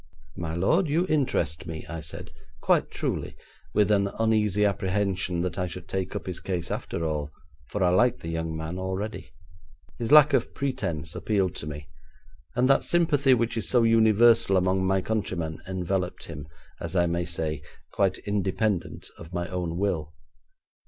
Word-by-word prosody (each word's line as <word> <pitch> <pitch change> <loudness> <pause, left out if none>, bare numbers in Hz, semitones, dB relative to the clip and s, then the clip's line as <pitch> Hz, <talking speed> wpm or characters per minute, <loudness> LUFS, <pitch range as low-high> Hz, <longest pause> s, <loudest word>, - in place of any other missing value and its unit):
'My 80 -1 -4
lord, 160 - +2
you 165 +5 +2
interest 85 - 0
me,' 80 -2 -6
I 85 0 -6
said, 80 +1 -8 0.3
quite - - +2
truly, - - -3 0.4
with 105 0 +4
an 100 -1 +3
uneasy 105 -2 +2
apprehension 95 -2 0
that 90 +1 -2
I 90 - 0
should 85 +1 -8
take 95 -1 -3
up - - -4
his 90 -1 -4
case 90 -2 -3
after 85 - -3
all, 75 -2 -2 0.4
for 105 - -1
I 90 - +4
liked 120 +7 +3
the 80 - -5
young 80 -1 -3
man 80 +3 -5
already. 95 +2 -4 0.7
His 115 +2 -2
lack 150 -1 +8
of - - +1
pretence 85 - -2
appealed 95 -4 0
to 75 - -6
me, 75 -1 -7 0.7
and 125 +1 +3
that 135 - +4
sympathy 145 -6 +3
which 115 -1 -1
is 110 - -1
so 120 -2 +4
universal 115 -2 +5
among 95 +1 +1
my 95 0 +2
countrymen 95 -7 -2
enveloped 95 0 -2
him, 75 -3 -8 0.3
as 85 +2 -5
I 85 -1 +4
may 85 0 -1
say, 80 -3 -3 0.3
quite - - +1
independent 100 -1 -1
of 85 +2 -10
my 85 0 -2
own 90 -2 -3
will. 80 -6 -1
95 Hz, 165 wpm, -26 LUFS, 85-110 Hz, 0.7 s, lack